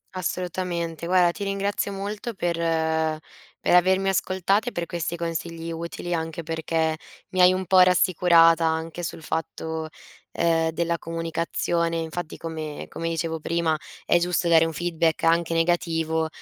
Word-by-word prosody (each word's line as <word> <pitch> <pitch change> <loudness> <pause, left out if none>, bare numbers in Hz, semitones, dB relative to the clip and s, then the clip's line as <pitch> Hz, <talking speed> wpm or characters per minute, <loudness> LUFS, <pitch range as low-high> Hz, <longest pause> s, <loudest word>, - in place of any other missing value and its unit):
Assolutamente. 175 -2 -3
Guarda 180 -1 +4
ti 200 - -6
ringrazio 200 +1 -1
molto 205 +4 -5
per 175 -2 -1 1.1
per - - +2
avermi 190 +2 +4
ascoltate 195 +5 +1
per 170 0 -2
questi 170 0 -3
consigli 165 0 -4
utili, 170 +1 -5
anche 165 0 -3
perché 160 0 -1 0.3
mi 185 - -3
hai 180 0 +7
un 185 0 -2
po' 185 +1 +5
rassicurata 170 -2 +5
anche 160 +2 -2
sul 160 -1 -5
fatto, 160 0 -3 0.5
ehm, 165 -1 +2
della 170 0 -1
comunicazione, 165 0 -1
infatti 165 0 -4
come 155 -2 -6
come 165 0 -4
dicevo 165 0 -2
prima, 165 0 0 0.3
è - - +4
giusto 175 0 0
dare 165 -1 +6
un 165 - -3
feedback 165 0 0
anche 165 0 +2
negativo, 165 -1 +1
170 Hz, 140 wpm, -25 LUFS, 165-180 Hz, 1.1 s, hai